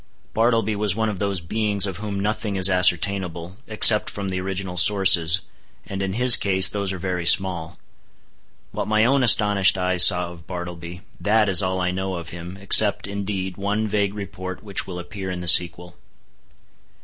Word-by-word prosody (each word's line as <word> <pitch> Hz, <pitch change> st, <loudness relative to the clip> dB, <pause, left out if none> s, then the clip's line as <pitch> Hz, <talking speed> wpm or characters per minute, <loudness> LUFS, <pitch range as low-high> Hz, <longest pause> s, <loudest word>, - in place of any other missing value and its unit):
Bartleby 115 Hz, -1 st, -1 dB
was 105 Hz, -2 st, -1 dB
one 110 Hz, 0 st, -3 dB
of 100 Hz, -3 st, -7 dB
those 100 Hz, -2 st, -4 dB
beings 105 Hz, +3 st, -2 dB
of 95 Hz, -4 st, -7 dB
whom 100 Hz, 0 st, -7 dB
nothing 105 Hz, 0 st, -4 dB
is 95 Hz, 0 st, +3 dB
ascertainable, 90 Hz, -1 st, -2 dB
except 110 Hz, 0 st, +6 dB
from 100 Hz, -1 st, -7 dB
the 95 Hz, -1 st, -5 dB
original 95 Hz, -1 st, -6 dB
sources, 90 Hz, -1 st, +3 dB, 0.4 s
and 100 Hz, 0 st, -8 dB
in 95 Hz, -1 st, -4 dB
his 125 Hz, +2 st, +5 dB
case 95 Hz, -2 st, +2 dB
those 100 Hz, -1 st, -5 dB
are 95 Hz, -, -7 dB
very 90 Hz, -1 st, -4 dB
small. 90 Hz, -4 st, +2 dB, 0.9 s
What -, -, -6 dB
my 110 Hz, +1 st, 0 dB
own 135 Hz, +2 st, 0 dB
astonished 100 Hz, -5 st, +3 dB
eyes 90 Hz, -1 st, +3 dB
saw 90 Hz, -1 st, +3 dB
of 85 Hz, -2 st, -17 dB
Bartleby, 90 Hz, -1 st, -9 dB, 0.2 s
that 105 Hz, +1 st, 0 dB
is 95 Hz, -3 st, +4 dB
all 95 Hz, 0 st, -3 dB
I 90 Hz, 0 st, -2 dB
know 95 Hz, 0 st, -5 dB
of 85 Hz, -1 st, -9 dB
him, 85 Hz, +2 st, -11 dB
except, 100 Hz, +1 st, +3 dB
indeed, 100 Hz, -2 st, -6 dB
one 105 Hz, +2 st, -4 dB
vague 100 Hz, -1 st, -3 dB
report 95 Hz, -2 st, -9 dB
which 100 Hz, -2 st, -4 dB
will 90 Hz, -2 st, -9 dB
appear 95 Hz, +2 st, -9 dB
in 90 Hz, -1 st, -7 dB
the 90 Hz, -, -7 dB
sequel. 85 Hz, 0 st, +2 dB
95 Hz, 175 wpm, -20 LUFS, 90-105 Hz, 0.9 s, except